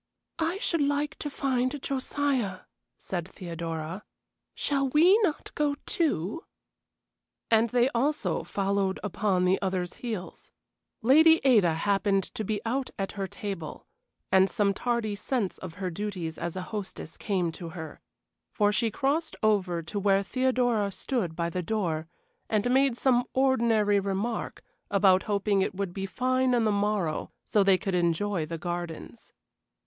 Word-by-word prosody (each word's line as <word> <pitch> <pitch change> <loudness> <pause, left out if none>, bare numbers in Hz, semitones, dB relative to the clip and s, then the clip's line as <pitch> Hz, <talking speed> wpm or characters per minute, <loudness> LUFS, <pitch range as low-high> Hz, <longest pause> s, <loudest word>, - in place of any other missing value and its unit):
"I 330 +3 0
should 335 -5 0
like 290 +1 +1
to 295 - -3
find 270 -1 -1
Josiah," 260 -7 -1 0.4
said 175 -2 -4
Theodora. 165 0 -5 0.5
"Shall 275 -2 0
we 330 +8 +6
not 365 -9 -1
go, 295 -1 +1
too?" 280 - 0 1.1
And 225 +1 +4
they 245 +1 +3
also 280 +4 0
followed 195 -1 0
upon 200 -3 +1
the 185 +1 +2
others' 185 -2 -2
heels. 220 -7 -6 0.5
Lady 320 +6 +7
Ada 210 -11 +5
happened 195 +2 +1
to 220 - -3
be 210 0 -1
out 255 +3 -1
at 195 -1 -2
her 195 -1 -4
table, 190 -6 -6 0.5
and 190 0 +5
some 200 -1 +1
tardy 235 -1 -1
sense 210 -1 -2
of 170 -3 -8
her 185 -1 -3
duties 180 -4 -4
as 170 0 -3
a 185 - -3
hostess 195 -6 -6
came 185 -5 -1
to 170 0 -8
her, 160 -3 -8 0.5
for 205 0 +2
she 215 +3 +1
crossed 280 +8 -1
over 185 -6 +2
to 200 +5 -4
where 195 0 +3
Theodora 245 -2 +1
stood 195 -4 -2
by 170 0 -1
the 180 - -2
door 170 -5 -2 0.4
and 220 +3 +1
made 265 -2 +3
some 245 -2 +3
ordinary 230 -6 +3
remark 200 +4 -3 0.3
about 190 -2 +4
hoping 200 -1 +2
it 190 - -1
would 195 -2 -3
be 195 0 -4
fine 255 +4 +1
on 235 - +2
the 215 - +2
morrow 200 -6 0 0.2
so 210 - +2
they 195 -1 +5
could 190 +1 -3
enjoy 175 0 0
the 165 +1 -4
gardens. 175 +5 -6
205 Hz, 150 wpm, -28 LUFS, 185-250 Hz, 1.1 s, Lady